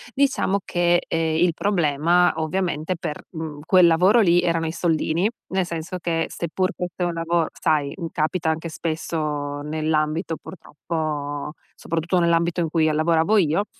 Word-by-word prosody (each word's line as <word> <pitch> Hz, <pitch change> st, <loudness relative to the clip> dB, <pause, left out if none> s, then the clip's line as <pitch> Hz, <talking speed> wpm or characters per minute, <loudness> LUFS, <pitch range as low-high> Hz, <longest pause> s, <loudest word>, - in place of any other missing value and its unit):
Diciamo 270 Hz, -8 st, +2 dB
che, 175 Hz, 0 st, +2 dB
ehm, 160 Hz, -1 st, 0 dB
il 175 Hz, -1 st, +3 dB
problema, 175 Hz, -2 st, +2 dB
ovviamente, 165 Hz, +1 st, -1 dB
per, 150 Hz, -, -5 dB
mhmm, 160 Hz, -3 st, -6 dB
quel 185 Hz, -1 st, +6 dB
lavoro 185 Hz, +8 st, +5 dB
lì, 175 Hz, -2 st, +4 dB
erano 165 Hz, -2 st, 0 dB
i -, -, -2 dB
soldini. 170 Hz, +3 st, 0 dB, 0.2 s
Nel 190 Hz, -1 st, 0 dB
senso 170 Hz, +1 st, -5 dB
che, 165 Hz, -1 st, -1 dB
seppur 185 Hz, +4 st, -2 dB
fosse 180 Hz, 0 st, -4 dB
un 175 Hz, -1 st, 0 dB
lavoro 165 Hz, 0 st, 0 dB
sai, 150 Hz, -3 st, +1 dB
mhmm, 170 Hz, -3 st, -5 dB
capita 160 Hz, +1 st, -1 dB
anche 160 Hz, +1 st, -2 dB
spesso, 150 Hz, -3 st, -3 dB
nell'ambito 155 Hz, +2 st, -1 dB
purtroppo 150 Hz, -4 st, -5 dB, 0.2 s
soprattutto 170 Hz, +2 st, -1 dB
nell'ambito 170 Hz, +1 st, +2 dB
in 165 Hz, -, -1 dB
cui 160 Hz, -1 st, +2 dB
a -, -, 0 dB
lavoravo 165 Hz, +6 st, +2 dB
io. 170 Hz, +3 st, +2 dB
165 Hz, 150 wpm, -23 LUFS, 155-175 Hz, 0.2 s, quel